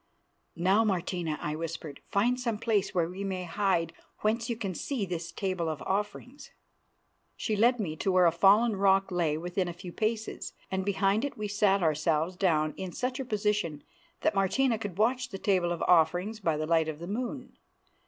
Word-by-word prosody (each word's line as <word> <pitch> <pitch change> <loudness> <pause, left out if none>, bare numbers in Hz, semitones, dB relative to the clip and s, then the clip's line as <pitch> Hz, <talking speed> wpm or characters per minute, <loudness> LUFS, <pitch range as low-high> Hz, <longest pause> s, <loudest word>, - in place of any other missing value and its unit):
"Now, 190 +6 +3
Martina," 175 -5 -1
I 150 - -3
whispered, 160 -2 -6
"find 240 +5 +2
some 235 -4 -1
place 210 -3 0
where 170 -2 +2
we 185 +3 -6
may 190 -2 -3
hide 170 -2 0 0.3
whence 230 +2 0
you 235 - 0
can 200 -4 -4
see 235 - -2
this 170 -2 -4
Table 185 -3 -2
of 155 -2 -4
Offerings." 210 +7 -3 0.9
She 215 - -1
led 240 +4 +3
me 165 -7 -2
to 190 - 0
where 185 -1 +5
a 170 - +6
fallen 205 +6 +5
rock 195 0 +3
lay 165 -4 +1
within 180 +3 -2
a 175 - -4
few 175 0 -9
paces, 220 0 -2 0.2
and 190 0 -1
behind 200 +2 +1
it 285 - -3
we 210 -1 -3
sat 200 -2 +2
ourselves 160 +2 +1
down 155 -5 +1
in 190 -1 -5
such 255 +1 -2
a 265 - -3
position 210 - -1 0.4
that 315 - +2
Martina 220 +5 +2
could 205 -5 -5
watch 245 +4 +1
the 195 - -6
Table 185 -3 +1
of 170 - -2
Offerings 180 +5 +3
by 165 -6 0
the 155 - -2
light 160 0 +2
of 155 -2 -4
the 170 - -7
moon. 250 +6 -5
195 Hz, 190 wpm, -29 LUFS, 170-215 Hz, 0.9 s, a